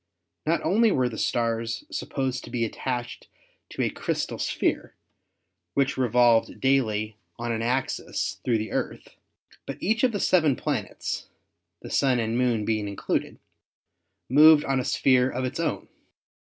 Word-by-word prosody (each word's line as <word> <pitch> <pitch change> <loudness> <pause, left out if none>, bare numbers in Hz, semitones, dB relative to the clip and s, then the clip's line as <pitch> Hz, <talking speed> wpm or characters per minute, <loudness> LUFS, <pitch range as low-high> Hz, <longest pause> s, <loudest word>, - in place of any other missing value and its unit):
Not 165 +2 +1
only 225 +3 +3
were 130 -7 +1
the 110 - -8
stars 115 - -1
supposed 135 - -3
to - - -11
be 120 -1 -1
attached 120 +1 -4 0.4
to - - -2
a - - 0
crystal - - -3
sphere, - - -1 0.8
which 140 0 +1
revolved 120 -2 +3
daily 110 -6 +1 0.2
on 120 0 -3
an 115 -1 -2
axis 125 +3 -2
through 120 -3 +2
the 110 0 -4
Earth, - - -3 0.6
but - - -5
each 220 +5 0
of 255 - +4
the 205 - -3
seven 160 -9 +3
planets - - -3 0.6
(the - - -8
Sun 135 -3 +2
and 115 -1 -1
Moon 120 -4 +1
being 110 -2 -1
included) 100 - -2 0.9
moved 150 +3 +7
on 135 -1 +1
a 125 - -2
sphere 130 -1 +3
of 130 0 -3
its 130 - -4
own. - - -2
125 Hz, 150 wpm, -26 LUFS, 115-135 Hz, 0.9 s, moved